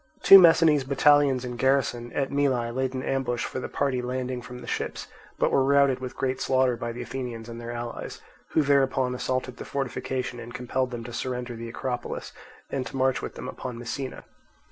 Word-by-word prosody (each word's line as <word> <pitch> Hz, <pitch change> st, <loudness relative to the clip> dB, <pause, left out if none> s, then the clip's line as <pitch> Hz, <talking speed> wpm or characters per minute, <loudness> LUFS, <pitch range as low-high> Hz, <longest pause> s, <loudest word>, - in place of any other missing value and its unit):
Two 195 Hz, -, +11 dB
Messinese 165 Hz, -4 st, +6 dB
battalions 140 Hz, -1 st, +4 dB
in 125 Hz, -1 st, -5 dB
garrison 120 Hz, -2 st, +1 dB
at 135 Hz, -2 st, -1 dB
Mylae 130 Hz, -4 st, +1 dB
laid 130 Hz, +1 st, -1 dB
an 130 Hz, -, -3 dB
ambush 130 Hz, -3 st, -1 dB
for -, -, -4 dB
the -, -, -5 dB
party 135 Hz, -3 st, 0 dB
landing 125 Hz, 0 st, -3 dB
from 125 Hz, 0 st, -9 dB
the 125 Hz, -, -10 dB
ships, -, -, -3 dB, 0.3 s
but -, -, +2 dB
were 135 Hz, -, +4 dB
routed 140 Hz, -1 st, +4 dB
with 130 Hz, 0 st, -7 dB
great 130 Hz, -1 st, -1 dB
slaughter 130 Hz, -2 st, +2 dB
by 120 Hz, 0 st, -4 dB
the 120 Hz, +1 st, -6 dB
Athenians 120 Hz, -2 st, -6 dB
and 115 Hz, 0 st, -8 dB
their 120 Hz, -, -7 dB
allies, 120 Hz, 0 st, -6 dB, 0.3 s
who 155 Hz, -, +4 dB
thereupon 135 Hz, -2 st, +2 dB
assaulted 130 Hz, 0 st, -2 dB
the -, -, -6 dB
fortification 130 Hz, -2 st, -3 dB
and 120 Hz, +1 st, -9 dB
compelled 125 Hz, +1 st, -1 dB
them 120 Hz, -2 st, -6 dB
to 120 Hz, +1 st, -8 dB
surrender 125 Hz, -1 st, -3 dB
the 115 Hz, 0 st, -7 dB
Acropolis 125 Hz, +1 st, -4 dB, 0.4 s
and 130 Hz, -2 st, -2 dB
to -, -, -6 dB
march 130 Hz, 0 st, +2 dB
with -, -, -6 dB
them -, -, -7 dB
upon 125 Hz, -2 st, -6 dB
Messina. 130 Hz, +3 st, -5 dB
130 Hz, 195 wpm, -26 LUFS, 120-135 Hz, 0.4 s, Two